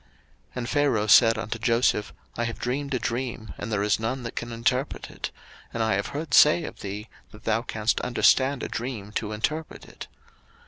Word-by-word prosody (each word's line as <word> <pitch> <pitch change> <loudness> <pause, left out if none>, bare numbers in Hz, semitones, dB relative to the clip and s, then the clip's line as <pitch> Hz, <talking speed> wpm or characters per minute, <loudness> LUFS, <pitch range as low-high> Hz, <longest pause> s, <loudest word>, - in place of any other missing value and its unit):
01:041:015 - - -32 0.5
And 125 -1 -3
Pharaoh 140 -8 +2
said 115 +1 +7
unto 115 0 -4
Joseph, 115 -2 +2 0.2
I 120 - -1
have 115 - -4
dreamed 140 +2 -2
a - - +2
dream, 120 -2 -3
and 105 +2 -5
there 105 -1 +1
is 105 +1 +2
none 120 +3 -2
that 115 - -6
can 120 0 -4
interpret 125 +4 -1
it: - - -5 0.4
and 115 - -1
I 110 - +2
have 100 +1 0
heard 145 -1 -5
say 155 +5 +7
of - - -7
thee, 105 +2 -6 0.2
that 105 - -15
thou 110 +1 +1
canst 110 -2 -1
understand 130 +2 +3
a - - -2
dream 115 -4 -5
to 110 0 -3
interpret 150 +9 -3
it. - - -10
115 Hz, 195 wpm, -26 LUFS, 110-130 Hz, 0.5 s, said